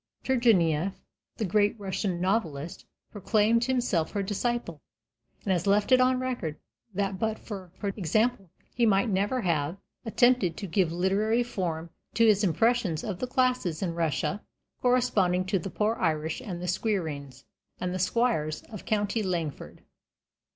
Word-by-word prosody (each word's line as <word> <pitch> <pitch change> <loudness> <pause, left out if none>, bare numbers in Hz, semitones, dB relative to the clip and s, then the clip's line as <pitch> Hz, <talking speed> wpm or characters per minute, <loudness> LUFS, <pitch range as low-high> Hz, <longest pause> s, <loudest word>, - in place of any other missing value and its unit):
Turgenief, 195 - +3 0.4
the 220 - -1
great 205 +3 +2
Russian 190 -2 -2
novelist, 175 -6 -2 0.2
proclaimed 220 +3 +2
himself 240 -11 0
her 200 - 0
disciple, 205 - -2 0.6
and 195 - -1
has 175 +1 -1
left 205 +4 +3
it 255 0 +7
on 255 0 +3
record 245 -12 -3 0.4
that 195 -1 -1
but 220 -1 0
for 190 -5 -8
her 200 - -2
example 200 +2 0 0.2
he 240 - 0
might 210 0 +3
never 205 +6 0
have 165 -2 0 0.3
attempted 240 -6 +3
to 205 - -5
give 180 -1 +1
literary 200 +7 +1
form 170 -8 -3 0.2
to 230 - +5
his 210 -1 +4
impressions 210 -2 +2
of 195 -4 -4
the 255 - -2
classes 250 -10 +1
in 170 -3 -1
Russia 165 +5 -1 0.4
corresponding 210 -8 +2
to 190 +1 0
the 185 - -5
poor 210 +3 0
Irish 160 +2 -1
and 180 -8 -6
the - - -3
squireens 160 - -2 0.3
and 180 0 -2
the 185 - -3
squires 185 -6 0
of 210 - -8
county 210 0 0
Longford. 170 -7 -4
195 Hz, 150 wpm, -28 LUFS, 175-225 Hz, 0.6 s, it